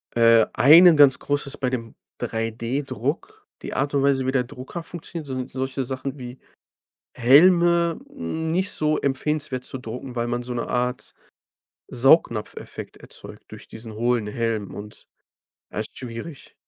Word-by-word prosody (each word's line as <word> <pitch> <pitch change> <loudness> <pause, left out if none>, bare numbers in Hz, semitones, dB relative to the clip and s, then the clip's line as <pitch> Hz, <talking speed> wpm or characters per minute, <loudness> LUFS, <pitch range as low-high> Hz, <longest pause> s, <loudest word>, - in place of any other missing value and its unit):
Äh, 115 -1 +6
einen 165 +5 +8
ganz 140 -3 +6
großes 145 -1 -2
bei 130 - -1
dem 115 -3 -5 0.3
3D-Druck 130 - -3 0.2
die - - -6
Art 140 +2 -1
und 140 - +2
Weise, 135 -2 +2
wie - - +2
der 130 -2 +1
Drucker 130 +6 -8
funktioniert, 165 -1 -8
sind 130 -1 -4
solche 130 0 -3
Sachen 130 +2 -5
wie 125 +1 -9 0.7
Helme 170 +6 +5
nicht 185 - -2
so 155 -3 0
empfehlenswert 140 -1 -2
zu 130 - -6
drucken, 125 +1 -7
weil 120 0 -1
man 120 0 -2
so 125 0 -5
'ne 120 - -3
Art 125 0 -2 0.7
Saugnapfeffekt 125 -4 +1
erzeugt - - -11
durch - - -11
diesen 110 -1 -10
hohlen 120 0 0
Helm 110 -1 -3
und, 105 +1 -10 0.7
ja, - - -5
ist - - -5
schwierig. 125 +5 -8
130 Hz, 145 wpm, -23 LUFS, 120-150 Hz, 0.7 s, einen